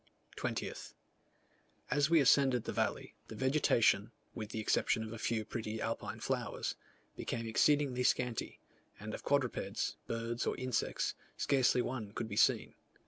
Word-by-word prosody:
20th. - - -4 1.0
As 145 0 +3
we 165 -1 +6
ascended 130 -2 +4
the - - -4
valley, - - -1
the 110 - -8
vegetation, 120 -5 +3 0.2
with 110 -2 -6
the 110 - -4
exception 110 +1 +1
of 110 0 -6
a 115 - -7
few 110 -1 -1
pretty 110 0 -4
alpine 115 +1 -3
flowers, - - -2 0.4
became 115 -1 -3
exceedingly 140 +2 +3
scanty, 125 -2 0 0.4
and 105 +2 -6
of - - -5
quadrupeds, 140 -5 0
birds, 115 +1 -2
or - - 0
insects, 130 -3 -1 0.2
scarcely 130 -2 +3
one 110 -5 -4
could 115 - -3
be 105 - -5
seen. - - +3
115 Hz, 140 wpm, -34 LUFS, 110-130 Hz, 1.0 s, we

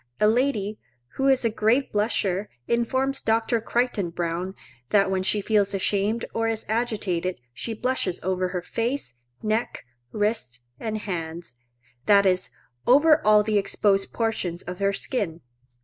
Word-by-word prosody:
A - - +4
lady, 220 -3 +1 0.4
who 270 - +2
is 265 -3 +3
a 230 - +2
great 225 +6 +1
blusher, 205 -2 0 0.2
informs 260 +3 0
Dr. 225 +1 +1
Crichton 235 -6 0
Browne, 175 +2 -3 0.3
that 195 -2 +3
when 190 -1 +1
she 205 +2 +1
feels 200 -1 +2
ashamed 205 +4 0
or 225 0 0
is 225 -1 -2
agitated, 205 -6 -1 0.2
she 225 - -4
blushes 245 -7 -1
over 185 0 0
her 180 -1 -4
face, 235 - -2 0.3
neck, 220 +2 -1 0.3
wrists, 205 - -1 0.2
and 220 -1 -3
hands,—that 160 - -2
is, 185 -1 +2 0.4
over 295 +4 +6
all 210 0 +6
the 210 -1 +2
exposed 195 0 +1
portions 205 -7 -2
of 180 +1 -7
her 200 0 +2
skin. 195 -5 -2
210 Hz, 140 wpm, -25 LUFS, 185-230 Hz, 0.4 s, over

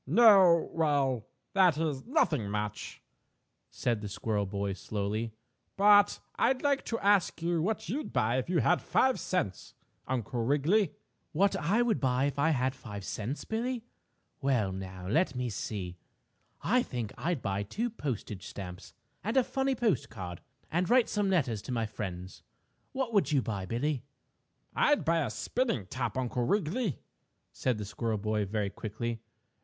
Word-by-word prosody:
"No 195 -7 +6
well 140 -8 +1 0.3
that 185 -6 +5
is, 150 -5 -1
nothing 155 - +2
much," 105 0 -4 0.7
said 115 -3 -1
the 105 - -5
squirrel 105 0 -1
boy 100 0 -2
slowly, 105 +4 -3 0.4
"but 205 0 +6 0.2
I'd 260 -1 +2
like 280 -1 +2
to 230 - -1
ask 200 -5 +3
you 170 -1 +1
what 205 +3 -1
you'd 275 - -3
buy 115 +4 +2
if 130 - -5
you 180 -2 +3
had 175 - +3
five 260 -1 +2
cents, 105 - -2 0.3
Uncle 125 -1 -2
Wiggily." 155 +7 +2 0.4
"What 195 +5 +3
would - - -3
I 215 +8 +3
buy 135 - +1
if 145 0 -2
I 150 +3 +4
had 130 -3 +1
five 105 -7 -8
cents, 115 +7 -4
Billie? 235 +1 -2 0.6
Well 125 -8 +2
now, 95 -1 -7
let 145 - +2
me 125 -1 -2
see. 95 -4 -4 0.7
I 250 +3 +3
think 120 - -4
I'd 170 -6 -2
buy 100 -1 -1
two 220 - -2
postage 120 - -4
stamps 90 -2 -8 0.3
and 220 +6 -1
a 260 - +6
funny 270 +1 0
postcard 110 - -2 0.3
and 175 +3 +1
write 250 0 +5
some 205 -2 +1
letters 130 - +1
to - - -7
my 115 -2 0
friends. 95 -4 -6 0.5
What 260 -3 -2
would 200 -6 +3
you 140 -4 +3
buy, 100 -4 -3
Billie?" 125 +4 -1 0.7
"I'd 295 -1 +3
buy 165 +1 +3
a 135 - -2
spinning 120 - -1
top, 120 +3 -3
Uncle 125 -1 -1
Wiggily," 200 - 0 0.5
said 125 -4 -1
the - - -5
little 100 - -6
squirrel 115 -2 -1
boy, 105 0 0
very 100 0 -2
quickly. 115 +2 -4
130 Hz, 160 wpm, -30 LUFS, -, 0.7 s, No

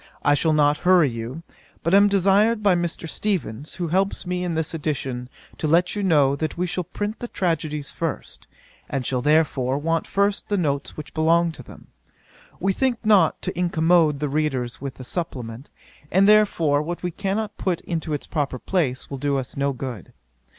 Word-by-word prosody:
I 145 - +4
shall 160 +3 +2
not 150 -1 +3
hurry 180 -7 +4
you; 115 +7 -6 0.4
but 170 - 0
am 200 +1 +7
desired 200 +3 +3
by 200 -2 +5
Mr. 175 -1 -2
Steevens, 155 - -3
who 175 -3 -3
helps 190 +3 0
me 180 0 -2
in 175 -2 -2
this 160 0 -1
edition, 135 -5 -3 0.3
to 155 - -1
let 170 +5 +3
you 205 - -2
know, 145 -7 +3
that 155 +2 -3
we 180 - 0
shall 180 0 -3
print 205 +5 -4
the 240 - -5
tragedies 155 -7 -2
first, 140 - -5 0.4
and 135 -2 -2
shall 125 0 -1
therefore 140 -3 +2
want 165 +2 -1
first 200 0 0
the 205 - +1
notes 140 -6 -2
which 150 -1 -8
belong 165 +2 +3
to 160 - -11
them. - - -14 0.7
We 195 +2 +1
think 260 +2 +1
not 200 -7 +4
to - - -3
incommode 165 -3 +3
the 150 - -1
readers 135 -5 -2
with 140 -1 -6
a - - -7
supplement; 125 -5 -5 0.4
and 195 +2 +4
therefore, 170 -9 +4
what 170 +4 -5
we 180 - -1
cannot 205 +3 -3
put 180 -3 -1
into 165 -2 -4
its 145 - -3
proper 145 -5 -2
place, 130 -4 -1
will 135 - -4
do 140 0 0
us 130 -1 -5
no 140 0 0
good. 130 -3 -7
160 Hz, 185 wpm, -23 LUFS, 140-180 Hz, 0.7 s, am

